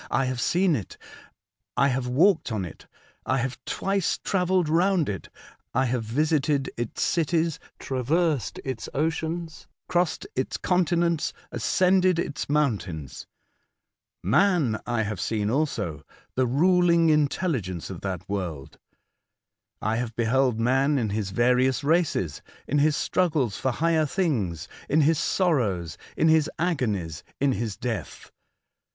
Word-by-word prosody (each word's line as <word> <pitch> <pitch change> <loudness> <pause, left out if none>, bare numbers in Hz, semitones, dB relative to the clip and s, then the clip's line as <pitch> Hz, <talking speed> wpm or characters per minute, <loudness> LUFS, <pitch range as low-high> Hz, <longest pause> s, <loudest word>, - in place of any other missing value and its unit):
I 135 +2 +1
have 130 -1 -2
seen 180 -2 +2
it; 105 -9 -6 0.8
I 140 +3 +4
have 130 -1 -1
walked 160 +3 +3
on 105 -4 -2
it; 85 - -11 0.4
I 130 - 0
have 130 +1 -2
twice 195 -2 0
travelled 185 -3 +1
round 175 +1 +2
it; 95 -5 -5 0.5
I 130 +2 +3
have 125 -1 -1
visited 145 +3 +1
its 120 -1 -3
cities, 165 -1 +1 0.2
traversed 140 - 0
its 130 -4 -4
oceans, 160 +2 -2 0.2
crossed 175 - 0
its - - -1
continents, 170 -3 +1 0.2
ascended 185 +9 +3
its 145 -5 -3
mountains. 100 - -1 1.0
Man 145 - +2
I 120 -2 0
have 105 -4 -4
seen 105 +2 -1
also 110 - -1 0.2
— - - -33
the 130 0 +2
ruling 170 +4 +4
intelligence 140 - 0
of 90 - -8
that 95 -2 -4
world. 85 -8 -5 1.0
I 110 +2 +1
have 115 -2 -3
beheld 120 0 +2
man 135 +5 +2
in 110 -5 -1
his 105 -2 -2
various 125 +5 +2
races, 150 - +1 0.3
in 145 - +1
his 150 0 +3
struggles 150 - 0
for 130 - 0
higher 160 +4 +1
things, 120 - -1 0.2
in 155 +2 +4
his 155 +1 +3
sorrows, 110 - 0 0.2
in 160 - +3
his 160 -1 +4
agonies, 110 - -1 0.2
in 140 0 +3
his 115 -5 -3
death. 115 -3 -5
135 Hz, 135 wpm, -26 LUFS, 110-165 Hz, 1.0 s, I